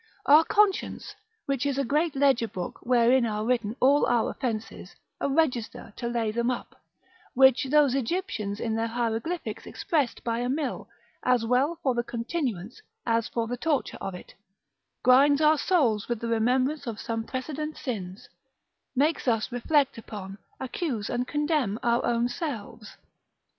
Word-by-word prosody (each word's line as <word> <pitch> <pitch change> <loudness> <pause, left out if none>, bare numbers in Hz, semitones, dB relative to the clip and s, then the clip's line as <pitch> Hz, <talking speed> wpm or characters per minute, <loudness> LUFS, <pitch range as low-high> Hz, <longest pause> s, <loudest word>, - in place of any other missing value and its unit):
Our 300 +3 +7
conscience, 415 +1 +1 0.3
which 275 -2 -1
is 280 -2 -1
a 275 - +1
great 300 +4 0
ledger 270 -4 +3
book, 180 -4 -6
wherein 245 +1 +4
are 215 -2 -1
written 230 -3 0
all 280 +3 +4
our 240 -2 +2
offences, 225 -4 -5 0.2
a - - -1
register 260 -8 -1
to 235 - -3
lay 235 -2 -1
them 235 +2 0
up, 250 - -5 0.5
(which 265 +1 +5
those 285 -1 +4
Egyptians 235 - -2
in 225 - -2
their 225 +1 0
hieroglyphics 235 +8 -3
expressed 290 -7 -1
by 230 0 -1
a 245 +1 -1
mill, 280 +1 -3 0.3
as 250 -2 +2
well 265 +8 +1
for 260 - +2
the 240 - 0
continuance, 235 - -4 0.2
as 230 -1 +1
for 230 -1 -2
the 245 +2 -4
torture 295 +1 -1
of 195 -2 -4
it) 180 - -12 0.7
grinds 275 +3 +6
our 305 -1 +4
souls 245 - +1
with 240 -2 -1
the 235 - -4
remembrance 255 +5 +1
of 225 -2 -4
some 225 -1 -3
precedent 300 +5 -5
sins, 210 -1 -5 0.7
makes 290 +2 +1
us 225 0 +1
reflect 265 +1 +1
upon, 195 -3 -8 0.2
accuse 260 - -3
and 245 +1 -1
condemn 295 -8 0
our 235 0 +2
own 235 0 +1
selves. 235 -6 -6
245 Hz, 155 wpm, -27 LUFS, 230-285 Hz, 0.7 s, Our